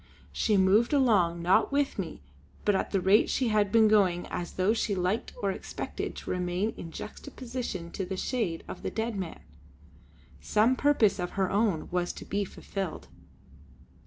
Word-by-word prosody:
She 210 -2 +1
moved 200 +7 +4
along, 195 -11 +3
not 190 +9 +3
with 280 -5 0
me 165 - -5 0.4
but 205 - +4
at 190 - 0
the 195 - +1
rate 195 +5 +4
she 255 -3 +1
had 210 -2 +2
been 225 -1 +6
going 190 -5 +3
as 175 - -4
though 190 +4 +2
she 220 -3 0
liked 185 +4 -1
or 200 - +2
expected - - -5
to - - -6
remain 180 +4 -1
in 165 - -8
juxtaposition 235 - -6
to 195 - -3
the 190 +1 -4
shade 200 -8 -2
of - - -8
the - - -2
dead 225 0 -2
man; 185 -4 -5 1.0
some 220 +5 +3
purpose 255 -8 +3
of 180 - -3
her 190 -1 +1
own 200 -6 +1
was 180 0 -1
to - - -9
be 200 +1 -1
fulfilled. 190 -2 -6
200 Hz, 170 wpm, -29 LUFS, 180-225 Hz, 1.0 s, been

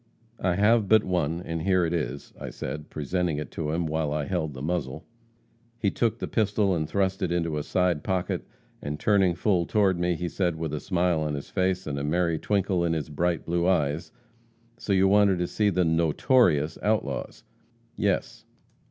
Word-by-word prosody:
'I 90 -2 +1
have 105 +2 +3
but 110 -1 +6
one, 85 -2 -1
and 80 -1 -3
here 95 -1 +2
it 80 - -2
is,' 70 -4 -4
I - - -6
said, 75 0 -6
presenting 80 +2 -1
it 75 - -5
to 75 -2 -3
him, 85 +2 -1
while 80 -1 -1
I 75 -1 -1
held 75 0 -2
the 65 - -7
muzzle. 80 -3 -3 0.7
He 105 -4 0
took 115 -2 0
the - - -4
pistol 105 -3 +1
and 80 -3 -2
thrust 95 0 0
it 90 -3 0
into 85 -3 0
a 75 - -1
side 90 0 0
pocket, 95 -2 -1 0.4
and 75 +1 -4
turning 95 -3 +3
full 90 -1 +1
toward 100 -5 +2
me, 90 0 +1
he 90 +2 -3
said 85 0 -1
with 80 -2 -4
a 75 - -2
smile 90 -3 0
on 75 -1 -1
his 70 - -7
face, 95 -1 0
and 70 -2 -3
a - - -3
merry 85 +1 0
twinkle 95 -2 0
in 85 -1 +1
his 80 -1 -3
bright 85 +3 -1
blue 85 +1 0
eyes: 75 -3 0 0.7
'So - - -4
you 95 0 +4
wanted 100 -1 +4
to 90 - 0
see 105 +4 +1
the 90 -2 +1
notorious 80 - +2
outlaws?' 105 -11 -2 0.5
'Yes.' - - -1
85 Hz, 195 wpm, -26 LUFS, 80-95 Hz, 0.7 s, but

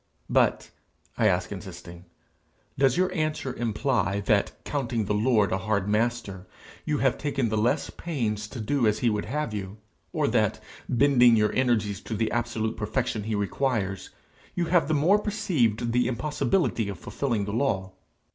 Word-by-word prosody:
'But,' - - +2 0.4
I 110 - +3
ask 90 -1 +1
insisting, 90 -3 -9 0.7
'does 135 -2 +3
your 185 0 +1
answer 155 -5 -2
imply 110 -4 0
that, 100 0 +2
counting 120 -6 -1
the 105 - -1
Lord 105 -1 +2
a 95 - 0
hard 100 -1 -1
master, 105 -4 -1 0.4
you 150 -1 0
have 135 -2 +1
taken 135 -5 -1
the 110 - -1
less 120 +8 +1
pains 110 -10 -3
to 120 - -8
do 120 +2 +1
as 105 - +2
he 115 - +4
would 105 -1 -2
have 145 +1 -3
you? 100 0 -5 0.3
or - - 0
that, - - +1 0.3
bending 125 -2 +5
your 105 -1 +2
energies 110 -7 +1
to 110 - -5
the 110 +1 0
absolute 115 -2 -2
perfection 110 0 -2
he 110 -1 -1
requires, 100 -2 -1 0.5
you 175 - 0
have 170 -3 +3
the 155 - +1
more 175 +9 +4
perceived 155 - 0
the 125 0 +2
impossibility 150 - 0
of 100 - -5
fulfilling 115 +2 -2
the 100 - -4
law? 105 -7 0
115 Hz, 165 wpm, -26 LUFS, 105-135 Hz, 0.7 s, bending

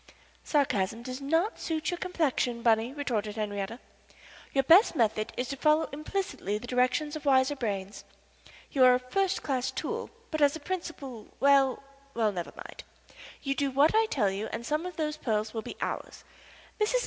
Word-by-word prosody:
"Sarcasm 230 -7 0
does 255 +2 -6
not 325 +9 +1
suit 320 0 -2
your 350 - -2
complexion, 275 -9 0
Bunny," 225 +1 +3
retorted 230 -8 -2
Henriette. 205 +1 -3 0.7
"Your 270 - +2
best 340 - +6
method 220 -3 +1
is 250 - -1
to 275 - -3
follow 305 +3 +3
implicitly 305 - -3
the 215 - -8
directions 255 +5 +1
of 310 - -6
wiser 265 +1 +4
brains. 200 -6 -4 0.7
You 270 -4 +4
are 250 0 +8
a - - 0
first 385 +10 -1
class 260 -2 0
tool, 265 - -4 0.2
but 310 -1 -2
as 285 0 +5
a - - -6
principal 290 - -6
well 275 -2 +4 0.3
well, 220 -2 +2
never 175 -3 -5
mind. - - -9 0.6
You 275 - 0
do 280 0 0
what 280 +4 +4
I 445 0 +4
tell 210 - +1
you 200 +3 -3
and 230 +2 -5
some 305 +6 -1
of 360 - -8
those 305 -1 -1
pearls 215 -5 -1
will 225 - -2
be - - -8
ours. - - -4 0.6
Mrs. 435 +4 +2
265 Hz, 175 wpm, -29 LUFS, 225-305 Hz, 0.7 s, are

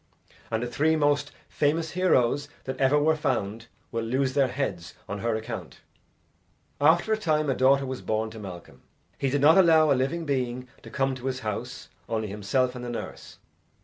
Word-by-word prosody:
And 110 +1 -1
the - - -2
three 155 +6 +2
most 145 -1 +1 0.2
famous 160 +2 0
heroes 145 -6 +2 0.2
that 130 - -5
ever 135 +2 +4
were 155 +2 +3
found 115 -6 -2 0.2
will 115 -1 -2
lose 130 +3 0
their 140 -1 +3
heads 100 -11 -4
on 100 - -4
her 115 +1 0
account." 110 0 -6 1.0
After 170 +8 +4
a - - +1
time 155 -7 +1
a - - 0
daughter 135 +2 +4
was 130 -1 -5
born 110 0 -1
to 110 - -9
Malcolm. 95 -4 -10 0.4
He 135 - +1
did 140 +1 0
not 160 +6 +7
allow 160 -4 +5
a - - +7
living 135 +6 -1
being 125 -3 -2
to - - -11
come 135 -1 0
to 130 0 -6
his 130 -1 -3
house, 105 -2 -5 0.2
only 110 -2 -2
himself 105 +6 0
and 125 -1 -7
the 120 - -5
nurse. 120 - -7
130 Hz, 185 wpm, -26 LUFS, 115-145 Hz, 1.0 s, not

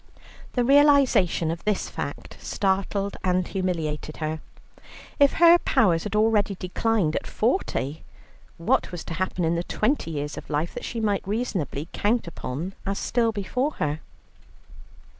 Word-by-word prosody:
The 245 - +2
realization 275 - +4
of 165 - -6
this 210 -2 0
fact - - -6
startled 195 +1 -1
and 180 -1 +1
humiliated 160 -5 -3
her. 155 0 -3 0.8
If 280 -1 +6
her 340 +1 +7
powers 170 - +2
had 210 - -3
already 210 -2 +3
declined 185 -2 0
at - - -3
forty, 160 - -1 0.6
what 165 - +1
was 175 -2 -6
to - - -6
happen 180 0 -1
in 165 - +2
the 170 0 -1
twenty 215 - 0
years 150 -1 -4
of - - -14
life 155 +3 -1
that - - -6
she 235 - -4
might 205 -4 0
reasonably 190 - -2
count 225 +2 +1
upon 170 +2 -5
as 195 0 -2
still 235 -2 +1
before 250 +8 -1
her? 150 +1 -2
190 Hz, 145 wpm, -25 LUFS, 165-225 Hz, 0.8 s, her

